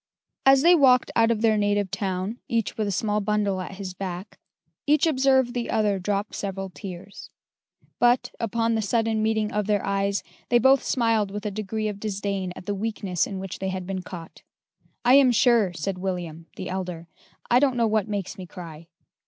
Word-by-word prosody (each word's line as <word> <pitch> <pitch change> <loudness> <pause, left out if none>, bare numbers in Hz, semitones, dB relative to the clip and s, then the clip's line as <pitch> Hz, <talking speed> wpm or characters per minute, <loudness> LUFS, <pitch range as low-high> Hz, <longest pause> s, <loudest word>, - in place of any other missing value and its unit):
As 270 0 +6
they 345 +2 +7
walked 260 -6 +5
out 225 0 +4
of 225 -2 0
their 220 -2 +4
native 205 -1 +1
town, 195 +4 -3
each 230 -2 -1
with 215 -2 -1
a - - -1
small 210 +2 0
bundle 205 -2 0
at 190 +1 -7
his 190 -1 -6
back, 185 +1 -6 0.5
each 300 +1 +4
observed 265 -4 +3
the 240 -2 -3
other 210 -3 +1
drop 200 +2 -2
several 195 -1 -4
tears: 185 +4 -9 0.7
but, 245 0 +3
upon 230 0 0
the 220 - +1
sudden 225 +1 0
meeting 220 -1 0
of 210 -1 -1
their 205 -2 +1
eyes, 200 0 0 0.3
they 240 - +5
both 265 +3 +5
smiled 225 -4 +1
with 205 +2 -6
a 210 - -1
degree 215 +1 -3
of 205 -1 -4
disdain 200 -3 -3
at - - -10
the 205 - -1
weakness 200 -4 -2
in 195 - -5
which 190 -1 -6
they 190 - -2
had 185 -1 -4
been 190 0 -3
caught. 175 -2 -10 0.6
"I 245 - +6
am 270 -2 +7
sure," 235 -5 +4
said 180 +3 -4
William 175 -3 -4
(the - - -6
elder), 180 -3 -5 0.4
"I 245 - +6
don't 265 -2 +2
know 235 - +3
what 220 -1 +1
makes 205 -1 -4
me 185 - -7
cry." 165 -3 -10
205 Hz, 195 wpm, -25 LUFS, 190-230 Hz, 0.7 s, they